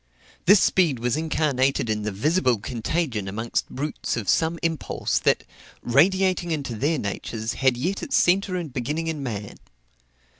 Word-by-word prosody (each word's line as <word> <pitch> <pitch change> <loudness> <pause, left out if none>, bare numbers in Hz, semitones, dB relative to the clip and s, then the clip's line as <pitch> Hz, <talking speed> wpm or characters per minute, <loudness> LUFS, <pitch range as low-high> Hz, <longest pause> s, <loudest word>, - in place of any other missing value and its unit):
This 200 +2 +8
speed 170 -9 +3
was 120 0 0
incarnated 145 -5 +1
in 105 -1 -1
the 105 0 -2
visible 130 - +2
contagion 115 - -2
amongst 110 +4 -2
brutes 145 -1 -3
of 105 -4 -4
some 160 - +2
impulse, 165 -1 -1
that, - - +2 0.4
radiating 180 +7 +3
into 145 -6 -2
their 145 +8 0
natures, 110 0 -4
had 130 -2 +2
yet 180 +10 -2
its 275 - 0
centre 185 +1 +2
and 165 -7 -4
beginning 150 +6 -2
in 160 -3 -3
man. 105 -6 -5
140 Hz, 150 wpm, -24 LUFS, 115-165 Hz, 0.4 s, This